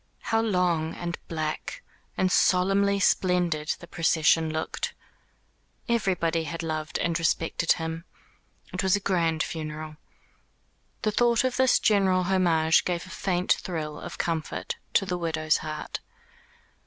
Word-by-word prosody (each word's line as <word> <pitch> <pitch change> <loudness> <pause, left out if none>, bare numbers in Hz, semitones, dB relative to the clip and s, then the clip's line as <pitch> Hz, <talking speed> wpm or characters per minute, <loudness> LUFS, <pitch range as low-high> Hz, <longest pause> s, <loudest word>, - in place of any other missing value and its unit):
How 225 - +4
long, 180 -7 +1
and 175 0 -4
black, 155 -2 -4 0.3
and 185 -1 +2
solemnly 195 +3 +3
splendid 175 -5 +1
the - - -10
procession 165 -1 +2
looked. 160 0 -3 0.9
Everybody 180 -8 +1
had 165 +2 -5
loved 155 -1 -3
and 170 0 0
respected 165 0 +1
him. 165 0 -5 0.7
It - - -1
was 190 -1 +3
a - - 0
grand 165 -5 +1
funeral. 155 -1 -6 1.1
The 215 - +2
thought 235 +2 +3
of 255 -1 0
this 260 -1 +4
general 190 -3 +3
homage 170 -4 +3
gave 175 0 -2
a 185 - -12
faint 185 -1 +1
thrill 155 -4 -4
of - - -8
comfort 165 -2 -2 0.2
to 195 - +4
the 180 -1 -2
widow's 160 -2 +1
heart. 155 -1 -5
170 Hz, 130 wpm, -26 LUFS, 160-190 Hz, 1.1 s, How